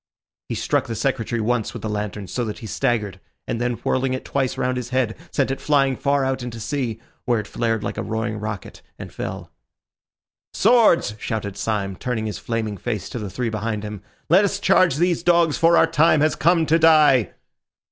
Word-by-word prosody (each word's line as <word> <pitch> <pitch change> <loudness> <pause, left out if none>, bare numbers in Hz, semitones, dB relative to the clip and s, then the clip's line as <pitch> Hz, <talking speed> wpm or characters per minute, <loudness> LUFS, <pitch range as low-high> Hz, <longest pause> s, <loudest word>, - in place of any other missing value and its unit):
He - - -2
struck - - 0
the 115 - -4
Secretary 120 -2 -1
once 115 0 -1
with - - -8
the - - -2
lantern 105 -1 -4
so 125 - -2
that 105 - -5
he - - -9
staggered; 110 -6 -1 0.3
and 115 - -2
then, 125 0 0
whirling 130 0 0
it 130 - -7
twice 135 -2 -1
round 130 0 0
his 125 -1 -4
head, 130 -4 0 0.2
sent 135 -1 0
it 135 - -4
flying 135 -3 +2
far 140 0 +1
out 130 0 -1
to 120 -2 -6
sea, 115 -1 -3 0.3
where 120 -3 +2
it 105 - -5
flared 115 0 -1
like - - -4
a - - -1
roaring 110 -1 -3
rocket 105 -3 -6 0.2
and - - -9
fell. - - -6 1.0
"Swords!" 220 - +4
shouted 105 -4 -4
Syme, 100 -3 -2
turning 115 +1 -3
his 105 -5 -4
flaming 110 -3 -3
face 110 -5 -4
to 120 - -5
the 105 -2 -5
three 115 +5 -2
behind 110 0 -3
him. 105 -2 -6 0.3
"Let 185 +6 +5
us 200 0 0
charge 185 -6 +4
these 175 +2 +1
dogs, 170 -3 +3
for 165 +1 +5
our - - +6
time 160 -1 +3
has 155 +1 +2
come 165 +1 +3
to 160 +2 +3
die." 150 - +5
125 Hz, 200 wpm, -22 LUFS, 110-145 Hz, 1.0 s, our